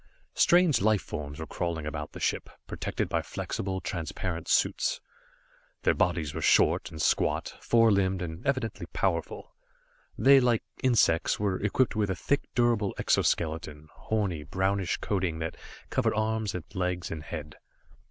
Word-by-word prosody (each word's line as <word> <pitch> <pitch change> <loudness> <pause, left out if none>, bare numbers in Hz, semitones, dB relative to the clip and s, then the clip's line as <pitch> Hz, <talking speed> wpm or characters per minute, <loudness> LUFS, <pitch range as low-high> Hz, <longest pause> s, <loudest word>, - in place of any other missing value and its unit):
Strange 175 - +4
life 110 0 +3
forms 70 -1 -6
were 80 - -4
crawling 85 -3 -3
about 75 -1 -5
the - - -8
ship, - - -1 0.2
protected - - -3
by - - 0
flexible, 95 -1 -4
transparent 85 -1 -4
suits. - - +1 0.8
Their - - +4
bodies 75 -3 0
were - - -4
short, - - +3
and 80 - -9
squat, - - +1
four 115 -1 +4
limbed 95 -2 +1
and 80 0 -6
evidently 130 -5 -2
powerful. - - -2 0.6
They, 135 +1 +7
like 120 -3 +2 0.2
insects, 115 -10 +3
were 100 -2 0
equipped 110 +5 +1
with 105 -2 +1
a 95 - 0
thick, 140 +9 0
durable 120 -4 +2
exoskeleton, 80 -2 0
horny, 100 -8 -2
brownish 95 +4 -1
coating 95 -5 -1
that 80 0 -4 0.4
covered - - +1
arms 110 -1 -1
and 90 - -4
legs 90 -1 -2
and 80 -2 -4
head. 75 0 -7
95 Hz, 145 wpm, -28 LUFS, 80-110 Hz, 0.8 s, They